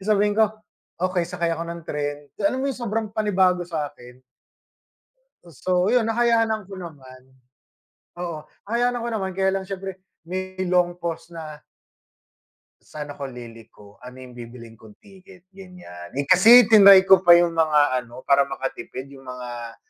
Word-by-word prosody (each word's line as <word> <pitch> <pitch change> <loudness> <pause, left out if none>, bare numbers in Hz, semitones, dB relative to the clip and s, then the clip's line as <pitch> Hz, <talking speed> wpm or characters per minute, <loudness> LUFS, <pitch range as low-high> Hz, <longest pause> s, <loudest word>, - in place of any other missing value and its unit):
sabihin 205 +1 +1
ko 220 0 +3 0.5
okey 180 -1 -1
sakay 170 -2 -2
ako 165 - -5
ng 170 0 -6
tren 145 -1 -4 0.2
alam 200 +6 +1
mo 275 - 0
yung - - -11
sobrang 220 -1 -3
panibago 185 -5 +1
sa'kin? 130 -6 -7 1.3
So 180 +5 -1
yun 240 -1 +2
nakayanan 225 -3 0
ko 195 - -9
naman, 135 -8 -11 1.0
oo 170 -3 -5 0.3
nakayanan 245 +3 0
ko - - -2
naman 190 -3 -3
kaya 190 0 +1
lang 195 - -2
siyempre 190 -1 -7 0.2
may 185 +2 -6
long 175 -1 +1
pause 165 -1 -6
na 155 -3 -10 1.3
saan 150 -1 -7
ako 140 -1 -7
liliko, 115 -4 -14
ano 125 0 -12
yung 125 - -13
bibilhin 115 -1 -11
kong 110 -2 -17
ticket 190 -2 -18
ganyan. 180 - -12
Eh 140 - -1
kasi 220 - +7
tinray 200 -3 +8
ko 190 -1 +6
pa 175 -2 +7
yung 175 -1 +2
mga 150 -5 +2
ano, 120 +1 -13
para 140 0 +3
makatipid 135 -1 -6
yung 135 -1 -14
mga 120 -2 -8
175 Hz, 150 wpm, -22 LUFS, 135-195 Hz, 1.3 s, tinray